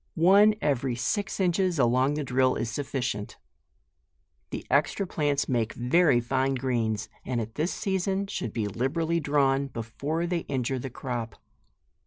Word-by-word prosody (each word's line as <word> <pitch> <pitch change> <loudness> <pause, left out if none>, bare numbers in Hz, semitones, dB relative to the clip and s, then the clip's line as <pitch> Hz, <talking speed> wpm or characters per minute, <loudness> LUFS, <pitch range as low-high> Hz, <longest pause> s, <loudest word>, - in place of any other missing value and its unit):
One 200 +6 +6
every 135 -3 0
six 200 - -2
inches 180 -1 +1
along 130 +2 +3
the 150 - -2
drill 130 0 +2
is 115 0 -2
sufficient. 125 -5 -3 1.1
The - - -6
extra 200 - +1
plants 145 -5 0
make 115 -4 0
very 130 +2 +3
fine 130 +3 0
greens, 115 -5 -1 0.2
and 125 -2 -2
at 110 0 -5
this 160 +7 -1
season 195 -1 -1
should 195 - -4
be 110 -1 -2
liberally 160 - 0
drawn, 140 -2 +2
before 140 +8 -3
they 175 0 0
injure 130 -1 -1
the 135 - -5
crop. 120 -2 -5
135 Hz, 145 wpm, -27 LUFS, 120-165 Hz, 1.1 s, One